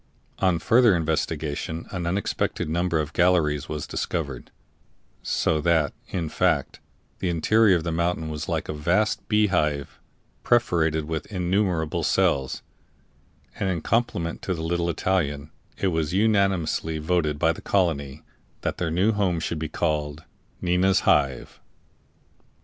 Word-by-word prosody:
On 95 -3 +2
further 115 +3 +4
investigation 80 0 -2
an 90 -3 -3
unexpected 95 -2 -1
number 85 +1 0
of 75 0 -3
galleries 80 -5 +2
was 75 -1 -4
discovered, 70 -8 -4 0.7
so 80 -1 0
that, 80 -2 +2
in 85 -3 -3
fact, 80 -4 0 0.4
the 90 - -1
interior 100 +5 +4
of 85 - -1
the 85 - -2
mountain 85 0 -1
was 75 0 -5
like 80 -2 -2
a - - -3
vast 85 +8 0
bee 105 -1 +4
hive 75 -4 -1 0.4
perforated 80 -10 +2
with 80 0 -4
innumerable 90 -4 0
cells; 65 -1 +1 1.0
and 95 - 0
in 85 -3 -1
compliment 100 -6 -1
to 95 - -2
the 80 - -5
little 85 +1 0
Italian 75 -4 -1 0.3
it 95 - +1
was 80 0 -1
unanimously 95 -6 +1
voted 80 -2 0
by 80 +1 +3
the - - -11
colony 75 -7 0 0.4
that - - -3
their 90 - -1
new 90 +7 +2
home 95 -5 0
should 80 0 -3
be 80 -1 -3
called 75 0 -2 0.4
"Nina's 90 +2 +3
Hive." 70 -3 +1
85 Hz, 140 wpm, -25 LUFS, 75-90 Hz, 1.0 s, further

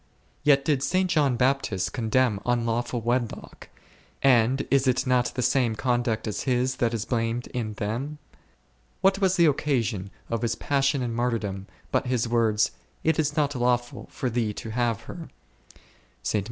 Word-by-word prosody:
Yet 140 -2 +4
did 145 -3 +2
St. 185 +5 +1
John 145 -7 +2
Bap 135 +3 +3
tist 95 -3 -2
condemn 115 -2 +1
unlawful 120 0 0
wedlock; 120 0 -3 0.5
and 130 0 +4
is 135 -1 +3
it 130 +2 +2
not 125 -1 +3
the 125 - -1
same 125 -5 +2
conduct 120 -2 0
as 105 -1 -3
his, 130 0 0
that 120 -2 +1
is 110 -2 -3
blamed 115 0 -1
in 110 -3 -3
them? 115 +9 -3 0.8
What 195 0 +3
was 190 -1 +3
the 170 - +5
occasion 120 - 0 0.2
of 115 -1 -2
his 115 -1 0
passion 135 -1 +1
and 120 -2 -2
martyrdom 110 -5 -2 0.2
but - - +1
his 125 -2 0
words, 115 -2 +2 0.3
It 160 0 +2
is 150 -1 0
not 145 -1 +2
lawful 120 -1 -1
for 130 - -3
thee 110 -2 0
to 115 - -6
have 115 -2 0
her 170 -2 -9 1.0
h - - +3
120 Hz, 165 wpm, -26 LUFS, 115-135 Hz, 1.0 s, the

